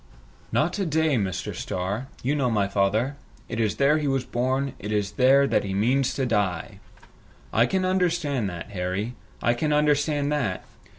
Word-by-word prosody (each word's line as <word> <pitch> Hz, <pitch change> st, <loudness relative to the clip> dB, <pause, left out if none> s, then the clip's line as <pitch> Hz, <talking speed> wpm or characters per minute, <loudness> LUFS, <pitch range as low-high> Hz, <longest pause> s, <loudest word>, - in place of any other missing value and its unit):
"Not 175 Hz, +6 st, +1 dB
a 195 Hz, -, 0 dB
day, 160 Hz, -1 st, +2 dB
Mr. 95 Hz, -6 st, -2 dB
Starr. 100 Hz, +8 st, -3 dB, 0.2 s
You 135 Hz, +4 st, +1 dB
know 135 Hz, -4 st, +1 dB
my 105 Hz, -3 st, +1 dB
father. 105 Hz, +8 st, +1 dB, 0.3 s
It 115 Hz, -, -4 dB
is 110 Hz, -3 st, +1 dB
there 145 Hz, +3 st, +3 dB
he 150 Hz, -, -1 dB
was 135 Hz, -1 st, +1 dB
born, 130 Hz, +2 st, -1 dB
it 105 Hz, +2 st, -5 dB
is 105 Hz, -2 st, 0 dB
there 130 Hz, +5 st, +5 dB
he 95 Hz, -6 st, 0 dB
means 125 Hz, +6 st, +2 dB
to 135 Hz, -, 0 dB
die!" 100 Hz, -7 st, -1 dB, 0.7 s
"I 115 Hz, +2 st, +4 dB
can 190 Hz, -1 st, 0 dB
understand 170 Hz, -, +1 dB
that, 85 Hz, +2 st, -7 dB
Harry. 95 Hz, +5 st, -2 dB, 0.3 s
I 120 Hz, -, +4 dB
can 150 Hz, +6 st, -1 dB
understand 150 Hz, -1 st, +2 dB
that! 125 Hz, -, -1 dB
125 Hz, 170 wpm, -25 LUFS, 105-145 Hz, 0.7 s, there